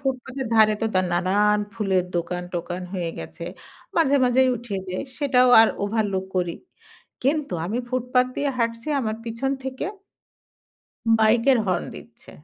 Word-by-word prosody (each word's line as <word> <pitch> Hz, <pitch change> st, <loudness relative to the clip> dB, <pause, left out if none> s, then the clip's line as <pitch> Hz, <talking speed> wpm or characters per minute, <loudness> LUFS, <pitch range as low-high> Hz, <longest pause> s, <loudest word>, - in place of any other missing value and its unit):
ফুটপাথের 265 Hz, -1 st, -3 dB
ধারে 215 Hz, -1 st, +6 dB
তো -, -, +3 dB
দা 185 Hz, -, +4 dB
নানান 200 Hz, +4 st, +2 dB, 0.2 s
ফুলের 195 Hz, -5 st, +1 dB
দোকান-টোকান 175 Hz, +1 st, -4 dB
হয়ে 175 Hz, -3 st, -2 dB
গেছে। -, -, -8 dB, 0.5 s
মাঝে, 285 Hz, -4 st, +4 dB
মাঝেই 255 Hz, +1 st, +4 dB
উঠিয়ে 215 Hz, -4 st, -5 dB
দেয়। 185 Hz, 0 st, -3 dB, 0.2 s
সেটাও 255 Hz, -3 st, +4 dB
আর 225 Hz, -, +6 dB, 0.2 s
overlook 205 Hz, -3 st, -1 dB
করি। 175 Hz, -2 st, 0 dB, 0.7 s
কিন্তু 285 Hz, -1 st, 0 dB
আমি 215 Hz, +6 st, -2 dB
ফুটপাত 250 Hz, 0 st, +1 dB
দিয়ে 285 Hz, 0 st, 0 dB
হাঁটছি 230 Hz, +2 st, -1 dB
আমার 220 Hz, -3 st, -2 dB
পেছন 230 Hz, +4 st, -2 dB
থেকে 265 Hz, +1 st, -4 dB, 1.4 s
বাইকের 230 Hz, +4 st, +4 dB
হর্ন 185 Hz, -2 st, 0 dB
দিচ্ছে। 235 Hz, +3 st, -13 dB
225 Hz, 135 wpm, -24 LUFS, 190-255 Hz, 1.4 s, ধারে